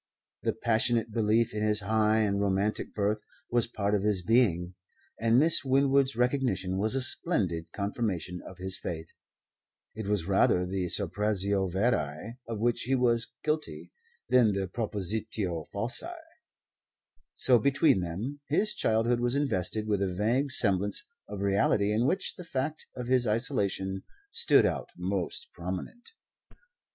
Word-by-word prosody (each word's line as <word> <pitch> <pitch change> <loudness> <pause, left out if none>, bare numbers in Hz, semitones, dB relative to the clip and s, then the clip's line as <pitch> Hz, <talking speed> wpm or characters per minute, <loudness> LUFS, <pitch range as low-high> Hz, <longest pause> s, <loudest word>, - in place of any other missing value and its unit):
The - - 0
passionate 115 0 +1
belief 110 +1 +1
in 105 - -3
his 105 0 +1
high 110 +1 +2
and 100 -2 0
romantic 100 +1 -1
birth 105 +1 0 0.3
was 120 -1 +2
part 105 -3 -2
of 105 - +2
his 100 -3 +1
being, 90 -6 +2 0.5
and 115 +1 +3
Miss 155 +3 +5
Winwood's 135 0 +2
recognition 120 -7 0
was 110 +5 +1
a 135 - +1
splendid 90 - -1
confirmation 100 -4 -3
of 95 - -11
his 95 0 +1
faith. 80 -1 -6 0.8
It 110 -1 -6
was 100 -5 0
rather 90 -1 +3
the 90 0 -2
suppressio 100 -1 0
veri 100 - -1
of 115 -1 -4
which 120 +1 +1
he 135 - +2
was 120 -2 +1
guilty 90 - -3 0.4
than 120 -4 +4
the 95 -1 -2
propositio 105 -4 -2
falsi. 120 - -2 1.2
So 125 -2 +5
between 140 - +3
them 100 +12 -4
his 210 +8 +2
childhood 115 +2 +1
was 120 +2 0
invested 110 -6 -1
with 105 -2 0
a 95 -2 0
vague 120 +9 0
semblance 100 - +1 0.2
of 100 - -6
reality 100 +1 +2
in 115 +4 +1
which 190 +5 -1
the 180 - -10
fact 150 0 -4
of 125 - -5
his 125 -1 +2
isolation 100 -5 -1 0.3
stood 465 +1 +4
out - - -2
most 90 0 -3
prominent. 95 - -7
105 Hz, 140 wpm, -29 LUFS, 95-125 Hz, 1.2 s, Miss